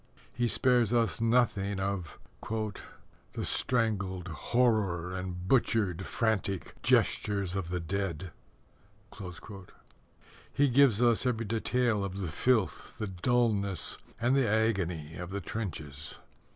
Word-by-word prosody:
He 120 0 +1
spares 120 -3 +3
us 115 -5 +1
nothing 115 -4 +2
of: 95 -4 -3 0.3
The 110 -2 -6
strangled 95 -7 0
horror 95 - +1
And 90 -1 -5
butchered, 100 -6 +2
frantic 105 -5 -1
gestures 100 -3 +2
of 95 -3 -3
the 90 0 -1
dead. 90 -1 -3 2.2
He 145 0 +4
gives 125 -3 +5
us 120 +1 +3
every 115 -2 0
detail 115 0 +1
of 95 -1 -4
the 90 -4 -2
filth, 115 +2 +1
the 110 - -2
dullness, 100 -2 +1 0.2
and 120 +3 +2
the 135 -5 +3
agony 90 -8 0
of 90 0 -6
the 100 +1 -3
trenches. 80 -8 -5
100 Hz, 110 wpm, -30 LUFS, 90-115 Hz, 2.2 s, gives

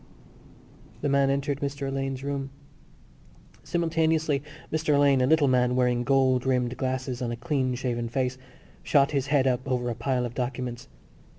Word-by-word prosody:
The 145 - 0
man 140 0 +3
entered 140 0 -1
Mr 140 0 -3
Alleyne's 135 -1 -3
room. 140 -1 -3 1.1
Simultaneously 160 -3 +1 0.3
Mr 155 -2 +2
Alleyne, 140 -2 +4
a 125 - +3
little 155 -1 +4
man 125 -1 +2
wearing 125 -1 +2
gold 130 -1 +3
rimmed 125 -2 0
glasses 130 -1 -3
on 120 - -1
a - - -2
clean 130 +1 -1
shaven 120 -2 -2
face, 130 +1 -1 0.4
shot 140 -1 +3
his 140 -2 -1
head 140 -2 +3
up 125 -2 +1
over 125 -2 -1
a - - -1
pile 125 +1 -1
of 120 - -6
documents. 125 -1 -4
130 Hz, 160 wpm, -26 LUFS, 125-140 Hz, 1.1 s, Alleyne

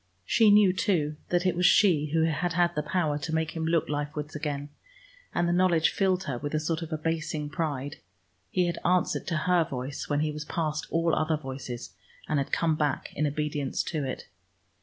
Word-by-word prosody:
She 220 - +4
knew, 205 -2 +6
too, 155 -7 0
that 175 +1 +1
it 185 - +2
was 180 +1 +4
she 175 -7 +4
who 160 +2 +1
had 165 +2 0
had 175 0 +2
the 150 - -1
power 150 -1 0
to 160 +2 -3
make 160 0 0
him 160 0 -4
look 165 -1 +2
life 145 0 -3
wards 150 0 -5
again, 145 -1 -3 0.6
and 175 - +1
the 170 - +2
knowledge 175 -3 +3
filled 190 -1 +1
her 140 -9 -3
with 145 +2 -3
a - - +2
sort 160 +2 -2
of 165 0 -6
abasing 155 -1 -2
pride. 145 -3 -3 0.5
He 180 -1 +1
had 170 - -2
answered 180 -1 +1
to 165 - 0
her 180 -2 +4
voice 135 -3 -5
when 145 0 +1
he 155 0 0
was 150 0 -5
past 155 0 -2
all 165 0 +1
other 155 0 +1
voices, 130 -4 -7 0.3
and 150 - +1
had 140 - -3
come 165 -2 +2
back 150 -3 -1
in 150 +1 +1
obedience 145 -2 -2
to 155 -2 -1
it. 130 -1 -4
155 Hz, 205 wpm, -28 LUFS, 150-175 Hz, 0.6 s, knew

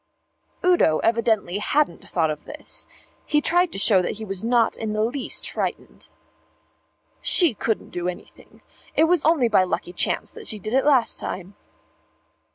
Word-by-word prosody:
Udo 350 - +4
evidently 220 -5 +1
hadn't 295 +7 -1
thought 160 -3 +1
of 150 0 -8
this. - - -5 0.4
He 300 - +1
tried 350 +3 +2
to - - -3
show 195 -1 +4
that 180 - -2
he 220 +1 -8
was 195 0 -5
not 235 0 +2
in 220 -1 -4
the 215 0 0
least 250 +4 -2
frightened. - - -5 1.1
"She 340 -8 +5
couldn't 220 +1 -3
do 175 0 -3
anything. 180 - -10 0.3
It - - +4
was 330 -1 +2
only 305 -6 +3
by 215 -4 +4
a 185 - 0
lucky 175 - -4
chance - - 0
she 215 - -1
did 215 +3 -6
it 265 +1 +2
last 265 -6 +3
time." 190 +2 -6
220 Hz, 165 wpm, -23 LUFS, 190-285 Hz, 1.1 s, She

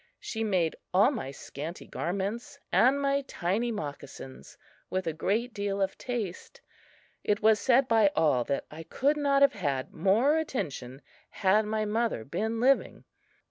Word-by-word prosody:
She 225 0 -4
made 185 -7 +1 0.2
all 200 +8 +6
my 220 - -4
scanty 145 +4 -7
garments 200 - -4
and 265 +3 +4
my 280 0 +1
tiny 205 +7 -1
moccasins 145 -7 -8 0.3
with 185 0 -2
a 165 - -1
great 220 +9 -1
deal 200 -1 -2
of 195 -1 0
taste. 240 - -5 0.6
It 210 0 0
was 220 -1 +5
said 260 0 +3
by 225 -4 +5
all 140 -6 +3
that 140 - -2
I 155 +2 -8
could 275 - 0
not 280 -1 +3
have 280 - +5
had 140 -9 -2
more 225 - +3
attention 145 - -4 0.3
had 210 +2 +2
my 215 0 -1
mother 220 - -1
been 220 - -2
living. 270 +3 +2
210 Hz, 150 wpm, -29 LUFS, 170-240 Hz, 0.6 s, all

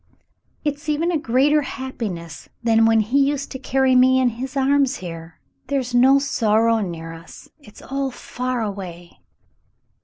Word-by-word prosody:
"It's 295 0 -3
even 320 +4 +1
a 335 - +1
greater 290 +3 +2
happiness 220 - -6
than 225 -1 +4
when 225 -1 +4
he 240 +7 +1
used 280 0 0
to 265 - -6
carry 265 -1 +2
me 260 +1 +5
in 255 -1 +3
his 255 +4 -6
arms 275 0 +2
here. 165 -4 -9 0.3
There's 260 -3 -2
no 260 +3 +6
sorrow 230 -4 +2
near 165 -5 -5
us. 165 +1 -13
It's 210 -8 -16
all 275 0 -2
far 250 -1 -4
awav." 185 -5 -6
250 Hz, 150 wpm, -21 LUFS, 210-275 Hz, 0.3 s, no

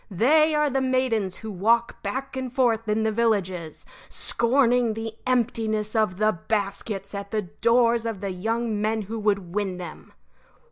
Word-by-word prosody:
They 305 - +4
are 300 0 +3
the 270 +1 +1
maidens 255 -7 0
who 220 -1 -7
walk 230 +5 +1
back 265 +7 -4
and 260 -1 -4
forth 230 -4 +1
in 215 +1 +1
the 220 - +1
villages, 195 -8 -1 0.2
scorning 240 -2 +2
the 225 0 -5
emptiness 225 -3 0
of 215 -5 +1
the 215 +1 +3 0.2
baskets 200 -1 -2
at 200 0 -5
the 215 -1 -1
doors 230 +4 +2
of 220 -4 -4
the 200 -1 -3
young 220 +3 -2
men 215 0 0
who 220 +3 -5
would 200 -4 0
win 195 -3 -1
them. 180 - -9
220 Hz, 160 wpm, -25 LUFS, 200-235 Hz, 0.2 s, They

